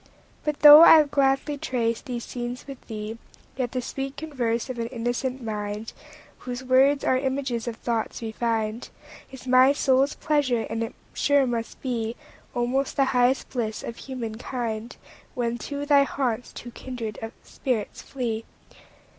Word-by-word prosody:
But 300 -1 -2
though 295 +1 +11
I'll 320 -2 +9
gladly 280 +1 +1
trace 230 -3 -1
these 245 -4 -5
scenes 245 +1 -5
with 275 -2 -9
thee, 220 0 -6 0.4
Yet 250 -2 -2
the 255 -1 -2
sweet 270 +2 -5
converse 245 -7 -2
of 255 -2 -5
an 230 - -1
innocent 245 +2 -3
mind, 210 0 -4 0.5
Whose 250 0 -6
words 265 +2 +4
are 260 - +3
images 260 -3 -2
of 235 - -3
thoughts 230 -1 -2
refin'd, 225 0 -2 0.4
Is 265 -1 -11
my 255 +2 +6
soul's 270 0 +2
pleasure; 285 -7 +1
and 225 0 -2
it 225 - -6 0.2
sure 285 -1 +3
must 235 -2 -3
beAlmost 245 +2 -3
the 275 - +3
highest 250 +1 +2
bliss 225 -4 -3
of 230 - -6
human 235 -5 -6
kind, 235 -2 -4 0.4
When 240 -1 -1
to 285 +2 -4
thy 285 -1 +5
haunts 255 -4 -1
two 240 - -9
kindred 235 -4 -6 0.2
spirits 235 -6 -3
flee. 230 -4 -3
245 Hz, 145 wpm, -25 LUFS, 230-270 Hz, 0.5 s, though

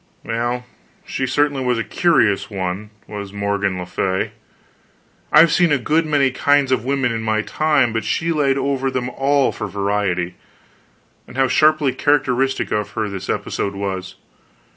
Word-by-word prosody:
Well, 120 +2 -2 0.4
she 130 - -2
certainly 145 0 +1
was 125 -1 +1
a 115 - -1
curious 115 - +2
one, 95 +1 -4 0.2
was 100 -2 -7
Morgan 100 -1 -1
le 90 - -5
Fay. 95 +1 -1 1.0
I 150 - +8
have 165 -1 +5
seen 170 0 +3
a 145 - +4
good 155 +5 +1
many 140 -3 +2
kinds 145 0 +2
of 125 -4 +1
women 135 -1 0
in 115 -1 -2
my 110 -1 0
time, 150 -6 +1
but 115 - -1
she 165 +1 -1
laid 140 -4 +2
over 135 -1 0
them 125 -1 -3
all 140 0 +2
for 110 - -5
variety. 100 -3 -1 0.9
And 125 - -11
how 135 0 +3
sharply 150 0 +3
characteristic 135 -2 +1
of 105 -1 -1
her 110 -2 -2
this 100 -2 -7
episode 100 0 -2
was. 95 -1 -4
125 Hz, 165 wpm, -20 LUFS, 100-140 Hz, 1.0 s, I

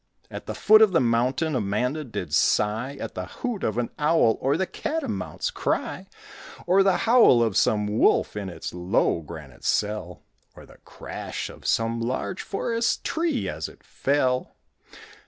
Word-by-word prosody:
At - - -8
the - - -4
foot 215 +1 +6
of 215 -4 +5
the 165 - +5
mountain 130 +6 +1
Amanda 125 +7 -1
did 100 - -6
sigh 115 - +1
At - - -6
the 90 -1 -5
hoot 235 - -5
of 110 +1 -1
an 120 -1 -1
owl 150 -7 +3
Or 140 +3 +1
the 190 - 0
catamount's 320 - -3
cry; - - -2 0.6
Or 185 +2 +4
the 195 -1 +3
howl 225 - +6
of 110 -4 -1
some 105 -1 +2
wolf 105 0 +2
In 100 -2 -4
its 85 - -7
low, 90 -1 +1
granite 75 -4 -11
cell, 105 -4 -1 0.3
Or - - -13
the - - -18
crash - - -6
of - - -10
some 115 +1 +1
large 130 +10 -3
Forest 230 +3 -1
tree 330 0 -1
as - - -4
it - - -18
fell. 130 -2 0
125 Hz, 160 wpm, -25 LUFS, -, 0.6 s, foot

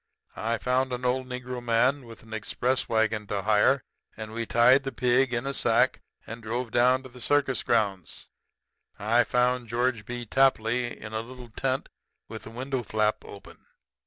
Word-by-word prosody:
I 115 +1 -1
found 130 +2 0
an 125 0 -4
old 130 +1 0
Negro 125 -1 -6
man 125 +3 +2
with 115 - -12
an 110 0 -12
express 120 +4 -1
wagon 110 -2 +1
to 100 -1 -2
hire; 110 +5 +3 0.3
and 110 -1 -7
we 115 0 -4
tied 125 +4 +5
the 135 -1 -4
pig 125 0 +2
in 120 +1 -2
a 140 - -2
sack - - +2 0.2
and 115 +1 -8
drove 115 +2 -3
down 125 +3 +3
to 130 - -10
the 125 0 -13
circus 140 -2 +1
grounds. 100 -7 -1 0.7
"I 115 +4 +3
found 125 -1 +1
George 120 -1 0
B. 120 0 -5
Tapley 120 -1 +1
in 105 0 -8
a 110 - -1
little 125 +1 -11
tent 130 +3 -2 0.4
with 110 -1 -9
a - - -7
window 130 +3 -3
flap 110 -2 0
open. 100 - -12
120 Hz, 175 wpm, -27 LUFS, 110-130 Hz, 0.7 s, tied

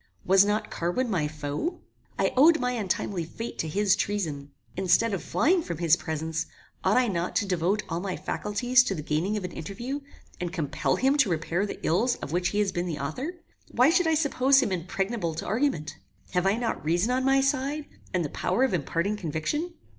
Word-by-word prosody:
Was 190 +1 +6
not 210 +1 -1
Carwin 200 +9 -1
my 160 -6 +1
foe? 150 - -4 0.4
I - - +1
owed 315 +5 +6
my 250 0 0
untimely 200 -5 -1
fate 225 +8 -7
to 160 - -1
his 195 +4 +2
treason. 155 -9 -2 0.3
Instead 190 +4 +3
of 195 - -2
flying 355 +3 +2
from 170 - -5
his 165 -1 +4
presence, 160 -1 -3 0.4
ought - - +3
I 255 -1 +4
not 175 -3 -2
to - - +2
devote 190 +2 0
all 165 -1 -2
my 185 0 -3
faculties 245 +5 +2
to 195 - -1
the 150 - -5
gaining 170 +9 0
of 205 - -4
an 180 - -4
interview, 235 - -5 0.4
and 175 -1 -3
compel 160 -5 -1
him 270 +3 +2
to 265 -8 +4
repair 170 +4 -1
the - - -6
ills 230 +9 +2
of - - -7
which 175 +1 +1
he 205 - -2
has 205 -2 +2
been 175 0 -2
the 160 -4 -3
author? 250 - -4 0.3
Why 255 +5 +4
should 360 -1 +3
I 320 - +3
suppose 275 -3 +4
him 210 - +1
impregnable 185 0 -2
to - - -5
argument? 215 - -1 0.3
Have 180 0 +1
I 195 - +3
not 235 -1 -2
reason 175 +9 +1
on 255 +1 +1
my 270 +1 +4
side, 275 +2 0 0.3
and 180 -3 0
the - - -3
power 255 - 0
of 265 - +1
imparting 170 +5 -1
conviction? 210 - -3
195 Hz, 205 wpm, -27 LUFS, 170-255 Hz, 0.4 s, Was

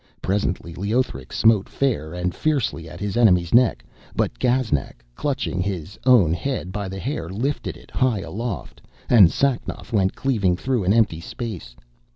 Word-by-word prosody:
Presently 95 -3 -2
Leothric 100 - -2
smote 110 -3 +3
fair 115 - -1
and 90 0 -2
fiercely 135 - -1
at 90 - -10
his 100 -1 -3
enemy's 90 -8 +4
neck, 120 0 +4 0.3
but - - -1
Gaznak, 120 - 0
clutching 135 - -2
his 95 0 -4
own 105 -11 +6
head 95 -1 -3
by 100 0 -4
the 95 - -6
hair, 105 - -4
lifted 125 +10 -3
it - - -18
high 125 -6 +1
aloft, 115 -1 -5 0.3
and 105 -8 +8
Sacnoth 135 -3 -1
went 95 -3 +2
cleaving 105 -9 +1
through 125 -3 -1
an 95 - +3
empty 110 -8 +2
space. 95 - -7
100 Hz, 155 wpm, -23 LUFS, 90-125 Hz, 0.3 s, and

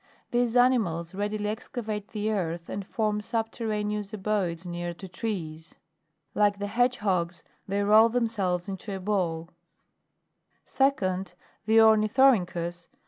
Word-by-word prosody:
These 240 -1 +1
animals 210 -10 +2
readily 210 +1 -2
excavate 215 -1 -5
the 215 0 -2
earth, 170 -4 -3
and 200 - -4
form 210 -2 -1
subterraneous 215 -2 -2
abodes 190 -4 -1
near 175 0 -4
to 190 +2 -9
trees. 165 -5 -5 0.6
Like 205 -1 +2
the 205 - -3
hedgehogs, 200 -7 0 0.2
they 200 +1 0
roll 215 +3 +6
themselves 210 -7 0
into 195 +1 -5
a - - -5
ball. 180 -4 -1 1.1
12. 275 +1 +2
2d. 185 -3 -3 0.3
The 220 +1 +6
ORNITHORYNCHUS, 210 -6 +3
(Plate - - -45
4. - - -38
205 Hz, 130 wpm, -27 LUFS, 180-220 Hz, 1.1 s, roll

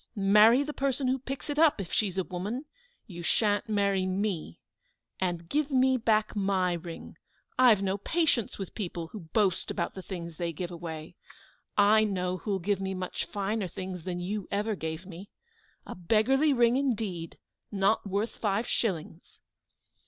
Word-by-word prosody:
"Marry 210 +6 +6
the 300 +1 -5
person 270 -1 0
who 260 +1 +1
picks 270 +3 -6
it 295 0 -2
up 315 -7 +5
if 185 -4 -5
she's 195 -4 0
a 190 - +2
woman; 200 - -4 0.4
you 175 -6 -8
shan't 205 +4 +1
marry 200 -3 +1
me. 185 - -2 0.6
And 175 -2 -2
give 295 - 0
me 260 -1 +4
back 220 -3 +1
my 190 -3 +1
ring. 170 -1 -7 0.4
I 255 -1 +8
have 210 -4 +4
no 195 +1 0
patience 300 - 0
with 195 -3 -6
people 175 -5 -5
who 215 - -8
boast 195 -5 +1
about - - -2
the 190 - -7
things 170 -4 -7
they 170 -1 -2
give 175 +3 -5
away. 165 -1 -7 0.6
I 210 +1 +6
know 185 -3 -1
who'll 200 +1 -2
give 195 +2 -1
me 190 0 -2
much 185 -1 -3
finer 205 0 -2
things 185 0 -6
than 180 0 -3
you 195 +2 -3
ever 210 +2 0
gave 160 -1 -5
me. 190 +2 -10 0.6
A - - -6
beggarly 230 - +3
ring 240 -1 +4
indeed, 210 - -2 0.3
not 200 +1 +2
worth 200 +4 -1
five 210 +1 -1
shillings!" 170 -8 -3
200 Hz, 165 wpm, -29 LUFS, 180-225 Hz, 0.6 s, I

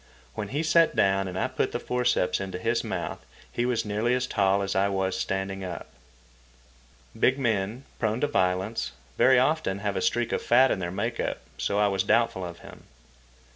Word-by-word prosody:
When 105 -2 -4
he 145 +8 -2
sat 165 +1 +4
down 95 0 +2
and 90 0 -5
I - - +1
put 130 0 -2
the - - -1
forceps 125 -8 0
into 95 -2 -4
his 115 +5 0
mouth, - - -4 0.3
he 120 +1 -1
was 120 -2 0
nearly 110 +4 +1
as 125 0 0
tall 100 -4 +2
as 95 - -2
I 100 +1 +3
was 95 -1 -1
standing 95 0 -3
up. 90 -3 -7 1.2
Big 130 +4 +3
men, 110 -1 -1 0.2
prone 110 0 0
to 145 - +2
violence, 95 - 0 0.2
very 130 -1 +5
often 130 -7 +1
have 100 0 -2
a 95 - -1
streak 120 +3 0
of - - 0
fat 130 +2 +5
in - - 0
their 85 -2 -3
make 110 +6 -3
up, - - -1 0.2
so 100 - 0
I 105 0 +4
was 95 -2 +1
doubtful 100 -1 +2
of 85 -1 -6
him. - - -13
105 Hz, 195 wpm, -27 LUFS, 95-120 Hz, 1.2 s, very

